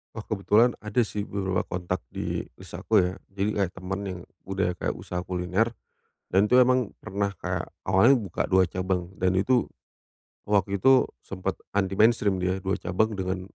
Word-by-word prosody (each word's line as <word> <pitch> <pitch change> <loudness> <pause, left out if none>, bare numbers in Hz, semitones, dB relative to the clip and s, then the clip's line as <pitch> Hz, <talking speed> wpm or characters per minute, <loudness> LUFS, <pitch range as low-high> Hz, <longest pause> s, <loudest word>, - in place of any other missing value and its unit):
Wah 110 - -6
kebetulan 110 +3 +3
ada 105 +3 +1
sih 105 +1 -4
beberapa 95 -2 -1
kontak 90 -1 -3
di - - -3 0.2
list - - -13
aku 110 - +1
ya. 90 -2 +3 0.2
Jadi 100 +2 -1
kayak 95 -3 0
temen 95 +1 -4
yang 90 -2 -5 0.2
udah 95 -2 -1
kayak 90 - -3
usaha 90 0 -4
kuliner, 90 +5 0 0.6
dan 95 +3 +4
itu 125 +4 +6
emang 125 -2 +2
pernah 100 -1 -2
kayak - - -2 0.2
awalnya 115 +7 +4
buka 95 -5 -2
dua 95 -2 +3
cabang 90 -1 -2
dan 95 0 +2
itu 120 +7 +2 0.8
waktu 100 -1 +1
itu 130 +2 +6 0.2
sempet 95 0 -3 0.2
anti-mainstream 100 0 +3
dia 90 +1 0
dua 95 0 -2
cabang 110 +5 0
dengan 95 -1 -3
95 Hz, 165 wpm, -26 LUFS, 95-105 Hz, 0.8 s, itu